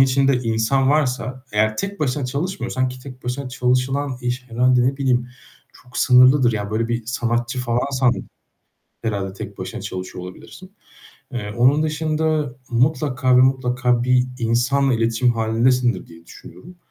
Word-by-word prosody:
içinde 135 +1 +4
insan 120 +3 +1
varsa 130 -3 -1
eğer 110 +1 +1
tek 200 - -4
başına 140 -1 -1
çalışmıyorsan, 130 -3 -2
ki 130 0 -9
tek 130 -1 -12
başına 125 +2 -3
çalışılan 130 +2 0
iş 125 +1 -3
herhâlde 125 +1 +3
ne 130 +2 +1
bileyim 125 -3 +1 0.5
çok 125 - -10
sınırlıdır, 125 0 +5
yani, 105 -1 -3
böyle, 115 +2 -1
bir 120 -1 -3
sanatçı 120 +2 -1
falansan 125 +1 +1 0.9
herhâlde 100 -4 -2
tek 95 - -8
başına - - -6
çalışıyor 90 -1 -6
olabilirsin. 185 - -12 0.6
Eee, 105 -4 -4
onun 135 +6 +4
dışında 155 -2 -1
mutlaka 130 0 +2
ve - - +7
mutlaka 125 -2 +2
bir 125 0 +3
insanla 120 +4 +1
iletişim 115 +1 +2
hâlindesindir 115 +2 +1
diye 85 0 -16
düşünüyorum. 180 - -13
125 Hz, 140 wpm, -21 LUFS, 120-135 Hz, 0.9 s, ve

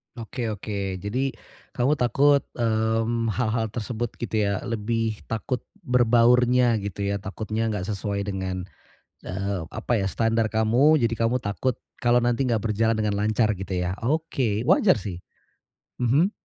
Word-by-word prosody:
Oke 120 +1 -4
oke, 100 -2 -3
jadi 130 +6 -1 0.4
kamu 130 +4 +2
takut, 140 +4 +4 0.2
mmm, 115 0 0
hal-hal 115 -2 0
tersebut 120 +2 -3
gitu 110 -3 -1
ya, 100 -1 -2
lebih 115 -1 -1
takut 115 +3 -2 0.2
berbaurnya 125 -1 +4
gitu 100 0 -4
ya, 100 0 -1
takutnya 110 +3 -3
enggak 105 -4 -2
sesuai 100 0 -2
dengan, 95 -2 -3 0.6
eee, 95 0 -2
apa 120 - -3
ya, 95 - 0
standar 115 +1 +1
kamu, 115 +8 +4
jadi 115 0 +2
kamu 125 +2 +1
takut 110 +5 -1 0.3
kalau 120 0 +4
nanti 120 +2 +1
enggak 115 -2 0
berjalan 110 +1 +1
dengan 105 -1 0
lancar 110 +1 +2
gitu 95 0 -6
ya, 90 +1 -1
oke, 125 -6 0
wajar 185 +4 +5
sih. 95 -3 -6 0.8
Mhm. 140 - +3
115 Hz, 140 wpm, -25 LUFS, 105-120 Hz, 0.8 s, wajar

